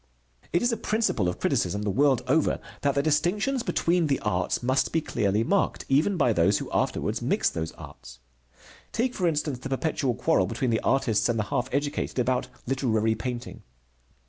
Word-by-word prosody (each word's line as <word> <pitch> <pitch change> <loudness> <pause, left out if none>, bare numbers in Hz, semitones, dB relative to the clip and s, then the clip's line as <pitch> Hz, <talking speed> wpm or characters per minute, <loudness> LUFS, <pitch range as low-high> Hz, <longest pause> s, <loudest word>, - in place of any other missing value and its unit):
It 175 - +1
is 240 - +2
a 230 - -1
principle 215 - 0
of 90 - -5
criticism, 100 +4 0
the 105 - 0
world 135 +4 +3
over, 150 +4 +2 0.2
that 140 -1 +1
the 140 - +2
distinctions 180 - +1
between 170 -6 +1
the 140 - +1
arts 105 +2 -1
must 130 +2 +1
be 165 - +2
clearly 105 -7 0
marked, 200 +11 0
even 155 +8 +2
by 120 -8 +3
those 85 -4 +3
who - - -6
afterwards - - -1
mix - - +1
those 80 -1 -4
arts. 60 0 -12 0.7
Take, 245 +2 0
for 180 -4 0
instance, 150 -5 -1
the 135 - -6
perpetual 135 -2 -1
quarrel 95 -4 +2
between 115 +4 -1
the 115 - +2
artists 120 -5 +1
and 115 - +1
the 105 - +1
half 125 +1 0
educated 145 +1 -2
about 125 0 +1 0.2
literary 115 -4 +1
painting. 120 +2 -5
135 Hz, 180 wpm, -26 LUFS, 110-160 Hz, 0.7 s, world